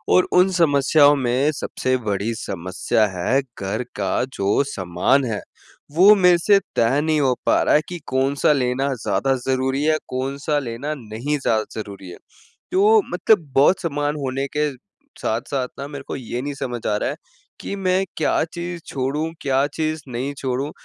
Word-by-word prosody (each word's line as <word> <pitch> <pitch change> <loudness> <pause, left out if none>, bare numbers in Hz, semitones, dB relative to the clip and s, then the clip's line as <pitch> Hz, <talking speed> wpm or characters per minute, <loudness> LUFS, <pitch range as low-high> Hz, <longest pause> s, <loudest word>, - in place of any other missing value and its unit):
और 185 - +4
उन 185 +1 +5
समस्याओं 145 -3 +4
में 130 +2 +1
सबसे 130 -1 -1
बड़ी 100 +3 -1
समस्या 95 +2 -1
है 130 +10 +1 0.2
घर 100 +5 -2
का 100 +2 0
जो 100 +7 +1
सामान 95 +5 +1
है, 110 -4 -3 0.5
वो 185 +7 +7
मेरे 180 -3 +5
से 200 +4 +4 0.2
तय 120 +5 +3
नहीं 155 -1 +1
हो 130 -2 +3
पा - - +3
रहा - - +3
है 150 - +4
कि 175 -1 -6
कौन-सा 135 +3 +2
लेना 135 +1 0
ज़्यादा 105 +6 +1
ज़रूरी 130 +1 0
है, 155 0 +3
कौन-सा 140 +3 -2
लेना 130 +3 -4
नहीं 120 +5 -3
ज़्यादा 110 -5 +1 0.2
ज़रूरी 100 -3 -8
है। 90 - -10 0.5
तो 420 +4 +5
मतलब 180 -4 +2
बहुत 145 +7 +4
सामान 145 -3 -1
होने 135 +1 -2
के 150 0 +1 0.5
साथ-साथ 125 +3 -2
ना 140 - -4
मेरे 145 -1 -8
को - - -4
ये 125 -1 -5
नहीं 145 +2 -4
समझ 120 -4 -5
आ 105 - +1
रहा - - -1
है, - - -4 0.5
कि - - -4
मैं 190 -1 +1
क्या 155 - +1
चीज़ 170 0 -5
छोड़ूँ, 140 +4 -2
क्या 135 0 +2
चीज़ 155 0 -2
नहीं 130 +4 -3
छोड़ूँ? 135 +2 -2
135 Hz, 170 wpm, -21 LUFS, 120-155 Hz, 0.5 s, वो